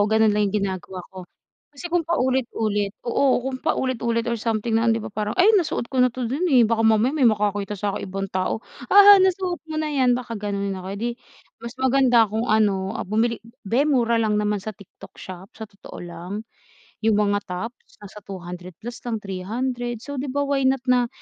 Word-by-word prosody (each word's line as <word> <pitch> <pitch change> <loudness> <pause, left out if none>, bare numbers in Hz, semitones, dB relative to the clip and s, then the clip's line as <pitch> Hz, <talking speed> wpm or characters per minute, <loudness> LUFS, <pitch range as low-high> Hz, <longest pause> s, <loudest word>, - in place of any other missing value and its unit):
ganun 220 -1 +4
lang 210 -1 +2
yung 210 - -1
ginagawa 185 -1 -5
ko. 185 -2 -10 0.4
Kasi 290 +4 -13
kung 350 - +3
paulit-ulit 245 -9 0 0.2
oo 255 +1 +2
kung 260 -1 -4
paulit-ulit 235 -6 0
or 235 -2 -2
something 225 0 -1
na 230 +1 +3
'di 225 - +3
ba - - -7
parang, 210 0 -3
"Ay 415 +5 +6
nasuot 350 -10 +1
ko 255 - +2
na 250 - +5
'to 250 +1 -5
dun, 290 +10 -1
eh". 255 -6 +6
Baka 225 0 +1
mamaya 225 +3 +3
may 275 -6 +4
makakita 205 -1 -1
saking 200 0 -3
ibang 195 +1 -3
tao, 185 +3 -1 0.3
"haha, 405 0 +9
nasuot 370 -1 +1
mo 310 - -4
na 310 -1 -1
yan" 255 -3 +3
baka 240 -2 -6
ganonin 200 -2 -3
ako. 185 - -8
Eh, - - -7
'di 235 +3 -1 0.5
mas 235 +1 -8
maganda 260 -3 +4
kung 220 +4 -3
ano, 205 -2 +1
ah, - - -4
bumili 225 +4 0 0.3
be 250 +7 +3
mura 240 -6 +2
lang 215 -2 +1
naman 210 0 0
sa 215 - -4
TikTok 200 -1 -15
shop, 185 +1 -10
sa 220 -1 -8
totoo 200 -1 -12
lang. 175 +1 -8 0.7
Yung 220 -1 +3
mga 205 -1 +2
tops, 200 +7 -7
nasa 205 +1 -10
200 180 -2 -8
plus 240 0 -6
lang 225 -2 -1
300. 240 +5 -3
So, 285 -2 -5
di 280 - -3
ba, 285 +2 -1
why 275 -2 +1
not 265 -1 +1
na 245 -1 +3
230 Hz, 200 wpm, -23 LUFS, 205-260 Hz, 0.7 s, haha